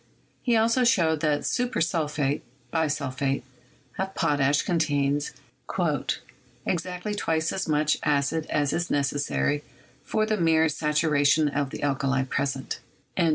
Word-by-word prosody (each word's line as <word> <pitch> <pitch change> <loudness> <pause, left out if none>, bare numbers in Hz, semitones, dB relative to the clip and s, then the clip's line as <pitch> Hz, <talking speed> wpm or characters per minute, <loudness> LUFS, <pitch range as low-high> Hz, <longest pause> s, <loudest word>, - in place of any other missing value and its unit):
He 240 -3 +2
also 230 +3 +3
showed 165 -10 +3
that 150 -1 +1
"super 250 0 0
sulphate" 150 -4 0 0.3
(bisulphate) 140 -4 0 0.6
of 190 0 -2
potash 145 -2 +2
con 175 -2 0
tains 145 -2 +1 1.4
"exactly 180 +3 -2
twice 160 -5 0
as 190 - -2
much 150 0 +2
acid 150 +2 +1
as 145 -2 +1
is 175 0 -1
necessary 145 +1 0 0.4
for 215 0 0
the 215 0 0
mere 160 -2 +4
saturation 150 0 +2
of 140 -1 -1
the - - -7
alkali 135 -1 +1
present." 135 0 -2
150 Hz, 120 wpm, -26 LUFS, 145-170 Hz, 1.4 s, mere